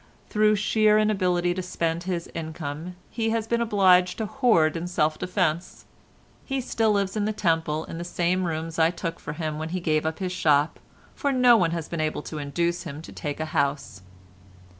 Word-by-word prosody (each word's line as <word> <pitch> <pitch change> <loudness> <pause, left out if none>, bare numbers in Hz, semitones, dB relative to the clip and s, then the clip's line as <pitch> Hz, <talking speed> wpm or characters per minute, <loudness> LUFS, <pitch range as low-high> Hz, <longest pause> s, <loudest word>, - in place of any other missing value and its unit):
Through 215 0 +4
sheer 215 +1 +3
inability 180 -5 +2
to 185 - -3
spend 170 -2 -2
his 175 -2 -2
income 160 +1 -5 0.2
he 225 -1 -1
has 225 -1 0
been 235 +1 0
obliged 190 -5 +4
to 220 - -2
hoard 210 - +3
in 165 +1 -3
self 155 -3 0
defence. 180 -2 -1 0.6
He 270 -1 -2
still 225 -3 +1
lives 200 -1 0
in 210 -1 0
the 215 - 0
Temple 160 -5 0
in 165 - -7
the - - -4
same 175 +1 0
rooms 165 0 -3
I 160 0 +5
took 170 -1 -5
for 150 - -6
him 155 -1 -4
when 160 +1 -4
he 185 +2 -2
gave 155 -3 +1
up 160 - -3
his 185 -2 -3
shop, 150 -4 +2 0.3
for 285 - -1
no 250 -2 +6
one 180 -7 +3
has 165 -2 -3
been 170 -2 -3
able 155 -1 -2
to 155 - -6
induce 170 +4 -1
him 155 -2 -7
to - - -10
take 145 -1 -5
a 155 - -1
house. 140 -8 -1
175 Hz, 200 wpm, -25 LUFS, 160-205 Hz, 0.6 s, no